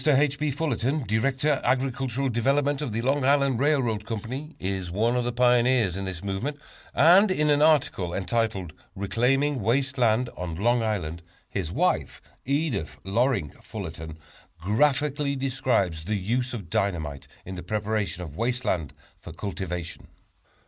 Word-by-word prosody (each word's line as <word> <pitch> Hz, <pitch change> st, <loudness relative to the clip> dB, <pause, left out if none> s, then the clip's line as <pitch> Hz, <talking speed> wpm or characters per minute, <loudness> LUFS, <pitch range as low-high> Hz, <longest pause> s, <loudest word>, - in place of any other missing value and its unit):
H. 145 Hz, -1 st, +3 dB
B. 150 Hz, 0 st, 0 dB
Fullerton, 140 Hz, -1 st, -1 dB
Director 135 Hz, +6 st, +1 dB
Agricultural 130 Hz, +1 st, 0 dB
Development 140 Hz, +4 st, +1 dB
of 145 Hz, -6 st, -2 dB
the 115 Hz, +2 st, -2 dB
Long 135 Hz, +2 st, +1 dB
Island 140 Hz, -2 st, +3 dB
Railroad, 130 Hz, -7 st, +1 dB, 0.6 s
is 95 Hz, -1 st, -3 dB
one 110 Hz, +7 st, +1 dB
of 125 Hz, -1 st, 0 dB
the 120 Hz, -, 0 dB
pioneers 120 Hz, -4 st, +3 dB
in 95 Hz, 0 st, -3 dB
this 95 Hz, -1 st, -5 dB
movement, 100 Hz, +10 st, -3 dB, 0.4 s
and 180 Hz, +7 st, +7 dB
in 150 Hz, -5 st, +2 dB
an 145 Hz, 0 st, +3 dB
article 145 Hz, -, +3 dB
entitled 95 Hz, -3 st, -1 dB, 0.2 s
"Reclaiming 125 Hz, +7 st, +1 dB
Waste 135 Hz, +5 st, +1 dB
Land 120 Hz, +1 st, +2 dB
on 90 Hz, -2 st, -4 dB
Long 120 Hz, +6 st, +2 dB
Island," 85 Hz, -7 st, -2 dB, 0.3 s
his 90 Hz, -5 st, -3 dB
wife, -, -, 0 dB, 0.3 s
Edith 140 Hz, -, -1 dB
Loring 100 Hz, -, +1 dB
Fullerton, 80 Hz, 0 st, -7 dB, 0.4 s
graphically 140 Hz, -, +1 dB
describes 130 Hz, -11 st, 0 dB
the 105 Hz, +5 st, -1 dB
use 120 Hz, +6 st, -1 dB
of 95 Hz, -7 st, -8 dB
dynamite 80 Hz, -10 st, -1 dB, 0.2 s
in 95 Hz, -, -6 dB
the 90 Hz, -, -6 dB
preparation 105 Hz, 0 st, -2 dB
of 75 Hz, -4 st, -9 dB
waste 125 Hz, +4 st, -1 dB
land 75 Hz, -5 st, -1 dB, 0.2 s
for 85 Hz, -, -10 dB
cultivation. 90 Hz, -1 st, -5 dB
120 Hz, 140 wpm, -26 LUFS, 95-135 Hz, 0.6 s, and